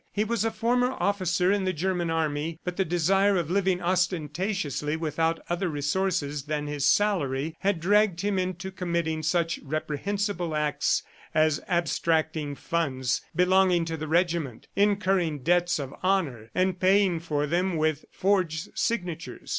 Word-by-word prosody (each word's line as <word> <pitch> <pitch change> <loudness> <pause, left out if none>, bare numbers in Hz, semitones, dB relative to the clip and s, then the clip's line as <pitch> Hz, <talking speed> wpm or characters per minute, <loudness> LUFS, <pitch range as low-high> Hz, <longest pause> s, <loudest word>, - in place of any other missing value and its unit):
He 210 - 0
was 225 -1 -1
a 225 - +2
former 245 +3 +1
officer 185 -2 +1
in 200 -1 +1
the 185 0 0
German 175 +1 -1
army, 160 0 -1
but 180 -1 -3
the 190 - +1
desire 190 +4 +2
of 170 -2 -2
living 190 -1 +1
ostentatiously 175 -3 -1
without 165 +1 0
other 175 +1 -1
resources 150 -1 -1
than 150 -1 -2
his 145 -1 -2
salary, 160 -6 +1
had 195 -3 0
dragged 195 0 +3
him 200 -1 0
into 185 +1 -3
committing 170 -4 -2
such 165 +1 0
reprehensible 165 +4 -2
acts 150 -1 +1 0.3
as 155 -1 +3
abstracting 160 -4 0
funds 130 -7 -1
belonging 180 -1 +4
to 165 0 -3
the 155 0 -5
regiment, 165 -7 0
incurring 195 -7 +1
debts 175 +2 +2
of 135 -3 -5
honor 160 - 0
and 185 0 +1
paying 190 -2 +3
for 150 -3 -1
them 175 +3 0
with 155 -1 0
forged 180 -5 0
signatures. 180 -8 -3
170 Hz, 145 wpm, -27 LUFS, 155-190 Hz, 0.3 s, belonging